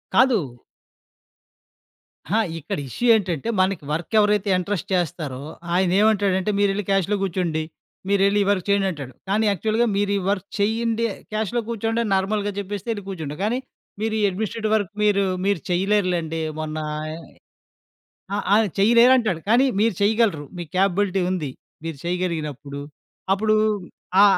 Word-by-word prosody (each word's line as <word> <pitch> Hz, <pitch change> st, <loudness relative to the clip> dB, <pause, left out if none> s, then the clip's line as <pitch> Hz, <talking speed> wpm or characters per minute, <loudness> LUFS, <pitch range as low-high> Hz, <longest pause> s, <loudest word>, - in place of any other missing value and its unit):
కాదు. 255 Hz, -4 st, +5 dB, 2.0 s
ఆ! -, -, +4 dB, 0.2 s
ఇక్కడ 155 Hz, -, -4 dB
ఇష్యూ 240 Hz, -, -3 dB
ఏంటంటే, 190 Hz, -2 st, -1 dB
మనకి 185 Hz, -3 st, +1 dB
వర్కెవరైతే 205 Hz, +5 st, +2 dB
ఇంట్రెస్ట్ 190 Hz, +1 st, -3 dB
చేస్తారో 155 Hz, -6 st, -2 dB, 0.3 s
ఆయనేవంటాడంటే, 195 Hz, +1 st, +2 dB
మీరెళ్లి 200 Hz, 0 st, +1 dB
క్యాష్‌లో 195 Hz, +1 st, +2 dB
గూర్చోండి, 170 Hz, -4 st, -1 dB, 0.5 s
మీరెళ్లి 200 Hz, +1 st, +3 dB
ఈ -, -, -3 dB
వర్క్ 185 Hz, -3 st, -1 dB
చెయ్యండంటాడు, 185 Hz, -10 st, 0 dB, 0.2 s
కానీ 215 Hz, +3 st, +2 dB
యాక్చువల్‌గా 220 Hz, +5 st, +1 dB
మీరీ 205 Hz, 0 st, +1 dB
వర్క్ 200 Hz, -1 st, -1 dB
చెయ్యండి, 225 Hz, +2 st, +1 dB, 0.3 s
క్యాష్‌లో 220 Hz, +2 st, -1 dB
కూర్చోండని 225 Hz, 0 st, -1 dB
నార్మల్‌గా 205 Hz, +2 st, 0 dB
జెప్పేస్తే, 200 Hz, +1 st, -5 dB
యెళ్లి 205 Hz, -3 st, -5 dB
కూర్చుంటా, 155 Hz, -6 st, -5 dB
కానీ 230 Hz, +5 st, +1 dB, 0.4 s
మీరీ 220 Hz, 0 st, 0 dB
ఎడ్మినిస్ట్రేటివ్ 215 Hz, +3 st, -2 dB
వర్క్ 205 Hz, -3 st, -1 dB
మీరూ 200 Hz, -1 st, +3 dB, 0.2 s
మీరు 200 Hz, -6 st, +1 dB
చెయ్యలేరులేండి, 180 Hz, -4 st, +1 dB, 0.2 s
మొన్నా 155 Hz, 0 st, -3 dB, 0.3 s
య్ -, -, -7 dB, 1.2 s
ఆ! -, -, +1 dB, 0.2 s
ఆ! -, -, +7 dB, 0.2 s
చెయ్యలేరంటాడు, 235 Hz, -3 st, +5 dB
కానీ 240 Hz, +4 st, +5 dB, 0.2 s
మీరు 220 Hz, -1 st, +3 dB
చెయ్యగలరు, 205 Hz, -7 st, +2 dB
మీకు 170 Hz, -4 st, -7 dB
కేపబులిటీ 195 Hz, 0 st, +2 dB
ఉంది. 165 Hz, -7 st, -2 dB, 0.3 s
మీరు 165 Hz, -2 st, -4 dB
చెయగలిగినప్పుడు 155 Hz, -6 st, -3 dB, 0.5 s
అప్పుడూ 215 Hz, +2 st, +2 dB, 0.7 s
ఆ! -, -, +9 dB
200 Hz, 125 wpm, -23 LUFS, 175-215 Hz, 2.0 s, ఆ